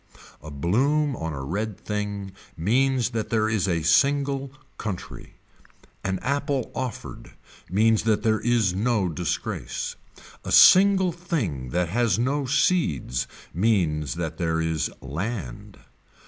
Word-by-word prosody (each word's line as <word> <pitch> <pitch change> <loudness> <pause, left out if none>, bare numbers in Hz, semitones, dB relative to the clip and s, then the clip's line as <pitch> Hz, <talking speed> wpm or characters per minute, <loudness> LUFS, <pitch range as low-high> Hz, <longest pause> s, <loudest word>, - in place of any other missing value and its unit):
A 75 - -9
bloom 130 - +1
on 80 -5 -4
a 70 -2 -5
red 100 +8 -3
thing 100 -2 -4 0.3
means 125 +8 +1
that 110 -2 -3
there 110 -1 +1
is 110 -4 0
a 85 -3 0
single 140 - +2 0.3
country. 100 -5 -6 0.7
An 95 0 -1
apple 140 -1 -1
offered 130 -2 -6 0.4
means 110 +4 +3
that 110 -2 +2
there 110 -1 +2
is 115 -6 +2
no 105 -1 +1
disgrace. 85 +1 -3 0.5
A - - -5
single 190 -1 +7
thing 135 - -3
that 90 +5 0
has 115 +3 +1
no 135 +3 0
seeds 105 - +1 0.3
means 80 - +1
that 85 -1 -4
there 80 -2 0
is 80 -1 -1
land. 80 - -5
105 Hz, 125 wpm, -25 LUFS, 85-130 Hz, 0.7 s, single